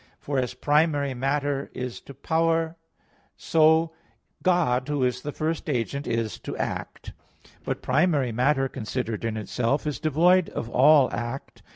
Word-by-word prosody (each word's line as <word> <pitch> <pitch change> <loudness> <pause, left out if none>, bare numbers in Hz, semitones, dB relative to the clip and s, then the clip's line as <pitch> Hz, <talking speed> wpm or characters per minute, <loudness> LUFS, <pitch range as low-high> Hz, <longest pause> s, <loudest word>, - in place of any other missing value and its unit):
For 140 -2 -2
as 125 -2 -2
primary 145 -2 +1
matter 140 +2 -1
is 125 -1 -5
to 140 - -11
power, 165 +3 0 0.6
so 160 0 +3 0.5
God, 150 -9 +2
who 145 -3 0
is 125 0 0
the 150 - -4
first 155 +2 -3
agent, 140 +2 -2
is 115 -4 -2
to - - -6
act. - - -5 0.5
But - - -4
primary 140 -2 +2
matter, 135 +4 +2
considered 115 -3 -4
in 115 -1 -2
itself, 115 +6 -1
is 150 -2 -3
devoid 170 +4 +3
of 115 - -5
all 140 +2 +5
act. 120 +3 -5
140 Hz, 145 wpm, -25 LUFS, 125-155 Hz, 0.6 s, all